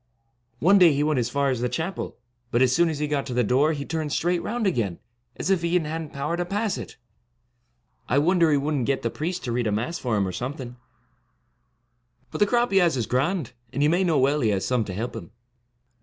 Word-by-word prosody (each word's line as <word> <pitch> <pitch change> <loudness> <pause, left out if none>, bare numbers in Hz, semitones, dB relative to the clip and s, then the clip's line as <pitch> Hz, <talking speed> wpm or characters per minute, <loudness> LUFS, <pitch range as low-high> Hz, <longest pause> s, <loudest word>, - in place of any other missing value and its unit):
One 195 +10 +5
day 170 -4 +7
he 140 +1 +1
went 150 -3 +1
as 120 0 -1
far 140 +1 +1
as 125 -2 -2
the 125 - 0
chapel; 170 +8 -4 0.3
but 120 +1 +3
as 125 -1 +3
soon 170 0 +3
as 155 - -3
he 150 +1 -1
got 145 -2 -1
to 125 - -4
the 125 - +3
door 135 +8 +3
he 140 -2 -5
turned 160 -2 -3
straight 175 +3 0
round 235 0 -2
again, 115 - 0 0.4
as 195 - -2
if 190 -3 +2
he 170 +1 +2
hadn't 160 -2 -4
power 145 +4 -2
to 175 - -1
pass 205 +3 -1
it, - - -9 1.1
I 130 - +2
wonder 170 +2 +4
he 145 - +3
would 145 +2 -1
n't 130 -5 -1
get 135 -1 0
the 115 - -1
priest 175 +4 -4
to 120 - -3
read 120 -1 0
a - - 0
Mass 120 +12 -2
for 120 -4 -1
him, 100 -2 +1
or - - -3
something; 125 - -5 1.6
but - - -5
the 205 - +4
crop 240 +1 +1
he 195 - +5
has 170 -7 +2
is 120 - -1
grand, 135 - -1 0.2
and 145 - 0
you 150 - +4
may 180 +3 +2
know 165 -5 +2
well 140 +3 +2
he 115 - +2
has 100 -2 0
some 125 -3 +1
to 95 - -6
help 115 +5 -4
him.' 100 -7 -8
145 Hz, 245 wpm, -25 LUFS, 125-170 Hz, 1.6 s, day